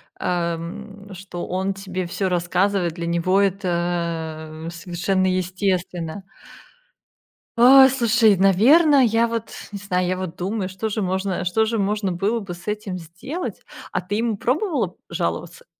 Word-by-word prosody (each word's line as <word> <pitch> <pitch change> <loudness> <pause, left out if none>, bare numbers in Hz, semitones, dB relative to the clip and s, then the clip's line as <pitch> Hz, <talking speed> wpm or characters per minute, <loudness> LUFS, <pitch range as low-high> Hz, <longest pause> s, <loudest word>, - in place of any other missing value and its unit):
ам, 180 +4 -4
что 180 -1 -7
он 190 +2 -1
тебе 190 -1 -5
всё 190 +2 -1
рассказывает. 180 0 +1
Для 170 0 -5
него 170 +3 +2
это 170 -4 -2
совершенно 180 +3 -1
естественно. 185 -1 -2 1.4
Ой, 265 +3 +8
слушай, 230 -5 +3
наверно, 265 - +5
я 230 +1 +2
вот 230 -1 -4 0.2
не - - -3
знаю, 185 -3 -1
я 185 - 0
вот 185 -2 -5
думаю, 190 +1 -2
что 190 +4 -4
же 215 0 -2
можно, 190 0 -1
э, - - -2
что 200 +5 +2
же 225 +1 -1
можно 200 -1 0
было 205 +7 0
бы 195 -5 -7
с 175 +1 -13
этим 210 -3 -3
сделать. 195 - -6 0.3
А - - 0
ты 190 +3 -4
ему 225 -1 0
пробовала 305 - -1
жаловаться? 485 +1 -3
190 Hz, 145 wpm, -22 LUFS, 175-215 Hz, 1.4 s, Ой